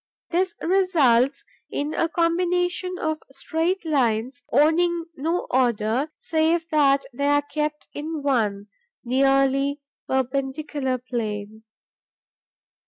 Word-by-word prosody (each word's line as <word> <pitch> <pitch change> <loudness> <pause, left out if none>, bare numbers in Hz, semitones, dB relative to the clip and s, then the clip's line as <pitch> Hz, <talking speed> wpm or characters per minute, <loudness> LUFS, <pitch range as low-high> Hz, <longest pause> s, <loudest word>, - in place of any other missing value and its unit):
This 360 +1 0
results 290 -9 +3 0.2
in 295 +2 -2
a 330 - 0
combination 355 +2 0
of 315 -2 -2
straight 325 +7 -2
lines 260 -2 0
owning 330 +5 +3
no 330 +6 -1
order, 240 +2 +1
save 325 +1 +1
that 280 -3 +3
they 280 +3 -1
are 290 0 +3
kept 300 +1 -3
in 305 0 -5
one, 215 -8 0 0.4
nearly 275 +2 +2 0.3
perpendicular 265 +1 -1
plane. 220 -3 -5
285 Hz, 100 wpm, -24 LUFS, 260-325 Hz, 0.4 s, results